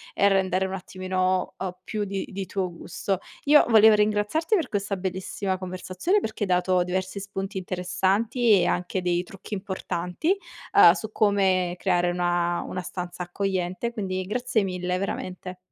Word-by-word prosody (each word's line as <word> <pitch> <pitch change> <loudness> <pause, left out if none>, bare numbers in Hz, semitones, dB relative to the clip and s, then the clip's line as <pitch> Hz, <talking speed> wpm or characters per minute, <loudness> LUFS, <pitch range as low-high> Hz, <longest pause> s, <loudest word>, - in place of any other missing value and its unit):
e 200 - +4
rendere 190 -1 +2
un 190 - -4
attimino 185 0 -1
o 185 -1 -5
più 210 +1 -3
di 195 -1 -3
di 195 -1 -5
tuo 185 -2 -2
gusto. 190 +2 -3 0.2
Io 295 +1 +6
volevo 220 -1 +8
ringraziarti 210 - +2
per 340 -7 0
questa 200 -1 -2
bellissima 190 0 -3
conversazione 185 - -1
perché 220 - -6
hai 200 - -2
dato 180 0 +3
diversi 185 +2 -3
spunti 195 0 -4
interessanti 195 +6 0
e 175 - +2
anche 180 +1 -1
dei 175 -1 +1
trucchi 195 +3 -10
importanti, 190 - -2 0.4
uhm, 170 -4 +9
su 220 +3 -6
come 190 -4 +2
creare 175 -2 +1
una 175 0 0
una 185 - -4
stanza 180 0 -6
accogliente, 185 +4 -2
quindi 185 -4 -2
grazie 235 +1 0
mille 180 -1 -2
veramente. 185 -1 -5
190 Hz, 155 wpm, -25 LUFS, 180-205 Hz, 0.4 s, uhm